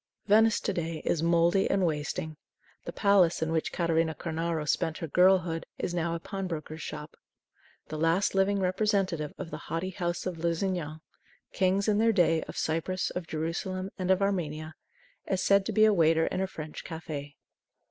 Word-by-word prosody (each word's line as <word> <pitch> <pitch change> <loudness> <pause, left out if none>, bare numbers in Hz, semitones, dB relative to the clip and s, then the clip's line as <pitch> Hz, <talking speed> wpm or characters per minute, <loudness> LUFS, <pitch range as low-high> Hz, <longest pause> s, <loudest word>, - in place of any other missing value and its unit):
Venice 220 +1 +5
to - - -1
day 165 -2 -3
is 160 - +1
mouldy 170 +3 +3
and 195 -2 +2
wasting. 155 0 -2 0.5
The - - -4
palace 190 -6 +3
in 160 - -2
which 160 -1 0
Catarina 165 -2 +1
Cornaro 165 -1 -2
spent 160 +2 0
her 165 - -4
girlhood 180 0 +3
is 175 - -3
now 170 -1 -1
a - - -4
pawnbroker's 165 -4 -5
shop. 150 0 -7 0.7
The 155 - -4
last 165 +5 +2
living 195 +1 +2
representative 185 -4 0
of 175 -3 -7
the 150 - -4
haughty 170 +3 -2
house 175 -2 -3
of 180 -3 -4
Lusignan 165 -2 -2 0.5
Kings, 190 +1 +1
in 210 -1 +3
their 225 +1 +4
day, 165 -4 +3
of - - -9
Cyprus, 165 +4 -1
of 180 -2 -5
Jerusalem, 180 +4 -3
and 185 0 -2
of 190 +1 +3
Armenia 155 -5 -2 0.6
is 190 -1 0
said 200 -1 +4
to - - -1
be 215 0 +5
a 215 - +5
waiter 160 -2 +4
in 185 - -2
a 190 - 0
French 155 -4 -8
cafe. 150 -3 -6
170 Hz, 175 wpm, -29 LUFS, 160-190 Hz, 0.7 s, Venice